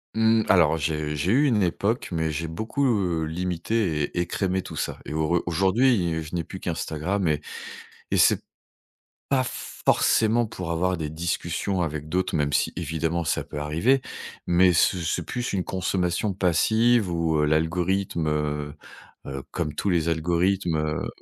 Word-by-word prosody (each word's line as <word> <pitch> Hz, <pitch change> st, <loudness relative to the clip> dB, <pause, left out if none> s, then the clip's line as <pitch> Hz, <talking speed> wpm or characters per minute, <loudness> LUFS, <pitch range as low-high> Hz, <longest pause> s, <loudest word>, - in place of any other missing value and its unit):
Mmh, 110 Hz, 0 st, +4 dB
alors 80 Hz, -4 st, +5 dB
j'ai 75 Hz, 0 st, -2 dB
j'ai 85 Hz, +7 st, 0 dB
eu 140 Hz, +5 st, +4 dB
une 110 Hz, -7 st, +3 dB
époque, 100 Hz, +6 st, 0 dB
mais 80 Hz, -2 st, -1 dB
j'ai 80 Hz, +2 st, -3 dB
beaucoup, 110 Hz, -, -3 dB
heu, 90 Hz, -8 st, +1 dB
limité 90 Hz, +1 st, -1 dB
et 90 Hz, -, -5 dB
écrémé 95 Hz, +1 st, -1 dB
tout -, -, -8 dB
ça -, -, -3 dB
et -, -, -6 dB
au 80 Hz, 0 st, 0 dB
re 85 Hz, +1 st, +1 dB
aujourd'hui, 95 Hz, -1 st, +2 dB
je 80 Hz, -, -11 dB
n'ai 85 Hz, -, -1 dB
plus 95 Hz, -, -9 dB
qu'Instagram 85 Hz, +3 st, -2 dB
et 75 Hz, -1 st, +1 dB, 0.7 s
et -, -, +3 dB
c'est -, -, +5 dB, 0.9 s
pas 135 Hz, -2 st, +3 dB
forcément 115 Hz, -1 st, +1 dB
pour 90 Hz, -5 st, -6 dB
avoir 90 Hz, +2 st, 0 dB
des 75 Hz, -2 st, -4 dB
discussions 85 Hz, +3 st, -2 dB
avec 75 Hz, -1 st, -4 dB
d'autres, 90 Hz, -1 st, 0 dB
même 70 Hz, -1 st, 0 dB
si -, -, +1 dB
évidemment, 80 Hz, +1 st, -1 dB
ça 75 Hz, -, 0 dB
peut 75 Hz, -, -8 dB
arriver 85 Hz, -, +2 dB, 0.5 s
mais 90 Hz, +1 st, +5 dB
ce 90 Hz, +2 st, +3 dB
c'est 85 Hz, 0 st, -2 dB
plus 125 Hz, 0 st, -3 dB
une 95 Hz, -2 st, -1 dB
consommation 95 Hz, +1 st, -1 dB
passive 110 Hz, +4 st, +3 dB
où, 85 Hz, -2 st, 0 dB
heu, -, -, +3 dB
l'algorithme, 85 Hz, +2 st, 0 dB
heu 75 Hz, -1 st, -1 dB, 0.5 s
heu, 70 Hz, 0 st, -5 dB
comme 75 Hz, -4 st, -3 dB
tous 100 Hz, -, -1 dB
les 85 Hz, -2 st, +1 dB
algorithmes, 85 Hz, +2 st, +1 dB
heu, 75 Hz, 0 st, -2 dB
85 Hz, 165 wpm, -25 LUFS, 80-95 Hz, 0.9 s, alors